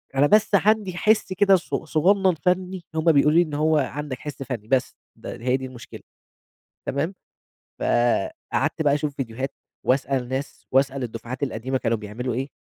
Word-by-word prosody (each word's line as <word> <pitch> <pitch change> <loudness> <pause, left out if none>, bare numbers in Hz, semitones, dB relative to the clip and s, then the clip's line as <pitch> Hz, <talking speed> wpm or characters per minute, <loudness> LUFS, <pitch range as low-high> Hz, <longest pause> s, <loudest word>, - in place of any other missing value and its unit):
أنا 145 +2 +5
بس 215 +4 +4
عندي 200 -2 +2
حِسّ 210 -1 +2
كده 195 +1 +5
ص 180 - -4
صغنّن 185 +5 +2
فني 180 +1 -1
هم 160 +1 +4
بيقولوا 150 +1 +4
لي - - +8
إن 155 -4 -2
هو 155 +1 +2
عندك 140 -1 -3
حِسّ 145 -2 -6
فني 115 -5 -5
بس، 130 0 +1 0.2
د - - -18 0.2
هي 125 +2 +2
دي 130 - -6
المشكلة، 125 -2 -10 0.9
تمام 150 +8 -1 0.7
فقعدت 120 +4 0
بقى 145 -2 +3
أشوف 145 -1 -2
فيديوهات 130 +1 -4 0.3
وأسأل 130 -1 +1
ناس، 135 +2 -5
وأسأل 135 0 +2
الدفعات 120 +3 -6
القديمة 130 0 -1
كانوا 115 -1 0
بيعملوا 110 +4 -4
إيه، 130 +3 -2
140 Hz, 160 wpm, -24 LUFS, 130-170 Hz, 0.9 s, لي